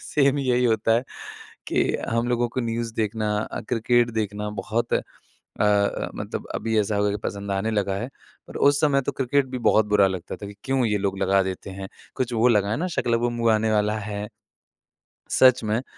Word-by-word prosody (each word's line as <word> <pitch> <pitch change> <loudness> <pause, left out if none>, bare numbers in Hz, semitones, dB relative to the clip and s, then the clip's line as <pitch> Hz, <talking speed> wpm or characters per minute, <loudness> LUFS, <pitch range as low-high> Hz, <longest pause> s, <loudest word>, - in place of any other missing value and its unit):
Same 140 -1 +2
यही 125 -2 +1
होता 115 -1 +2
है 120 +3 +1 0.6
कि - - +2 0.3
हम 115 +1 0
लोगों 120 0 +1
को 130 - -3
न्यूज़ 115 -1 -3
देखना 110 -1 -1
अ, 105 - -4
क्रिकेट 120 0 +2
देखना 105 0 -3
बहुत 115 +2 -2
अ - - +2 0.6
अ, 105 -1 +2
मतलब - - -5
अभी 110 -1 0
ऐसा 105 0 -1
हो 100 - +1
गया 105 - +2
कि 105 - -1
पसंद 100 0 -4
आने 100 +3 -1
लगा 100 -2 0
है। 120 +5 -4 0.4
पर - - -9
उस 145 0 +4
समय 145 -3 +3
तो 140 - -2
क्रिकेट 135 +1 +1
भी - - -1
बहुत 110 -1 +3
बुरा 105 -1 +4
लगता 95 -2 -5
था 100 - -8
कि 100 - -9
क्यों 135 -1 +1
ये 105 -2 +1
लोग 95 -1 -2
लगा 95 0 +3
देते 95 +1 -5
हैं? 95 0 -7 0.3
कुछ 125 -1 -2
वो 115 +1 +3
लगा 105 -4 +2
है 110 - 0
ना 180 - -1
शाका 130 -8 -2
लाका 115 0 +2
बूम 120 0 -1
बूम 115 -1 +3
आने 110 0 +1
वाला 105 0 +1
है। 105 0 -5 1.0
सच 130 -2 +5
में 110 0 0
अ, - - -8
110 Hz, 220 wpm, -24 LUFS, 105-120 Hz, 1.0 s, सच